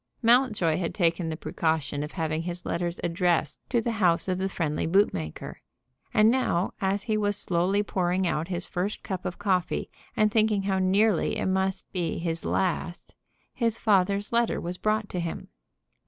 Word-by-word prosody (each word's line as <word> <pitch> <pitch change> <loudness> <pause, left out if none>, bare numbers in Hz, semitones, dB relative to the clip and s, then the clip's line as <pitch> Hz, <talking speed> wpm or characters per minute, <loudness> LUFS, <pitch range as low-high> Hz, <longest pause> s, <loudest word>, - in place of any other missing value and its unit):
Mountjoy 225 -9 +3
had 170 - -3
taken 170 -2 +1
the 160 - -4
precaution 160 -3 -1
of 150 +1 -5
having 160 -2 -1
his 175 +1 -5
letters 175 0 -2
addressed 170 -3 +1
to 240 -2 +2
the 235 - -1
house 180 -7 +2
of 185 -1 -1
the 190 +1 -1
friendly 160 -5 -1
bootmaker; 125 - 0 0.5
and 215 +1 +5
now, 205 -8 0
as 195 +1 0
he 220 -1 0
was 205 -1 +1
slowly 185 +3 +1
pouring 185 -1 0
out 165 -1 -1
his 180 -1 -3
first 190 +4 -3
cup 185 -2 -4
of 180 - -3
coffee, 190 -4 0 0.3
and 215 -1 +3
thinking 215 -2 +2
how 195 -1 0
nearly 195 +1 +2
it - - -2
must 190 0 0
be 175 -4 -2
his 165 -1 -3
last, 175 -2 -2 0.4
his 230 -2 0
father's 200 -1 +2
letter 235 0 +1
was 175 +1 -5
brought 215 0 0
to 180 - -4
him. 170 -1 -5
185 Hz, 170 wpm, -27 LUFS, 170-205 Hz, 0.5 s, and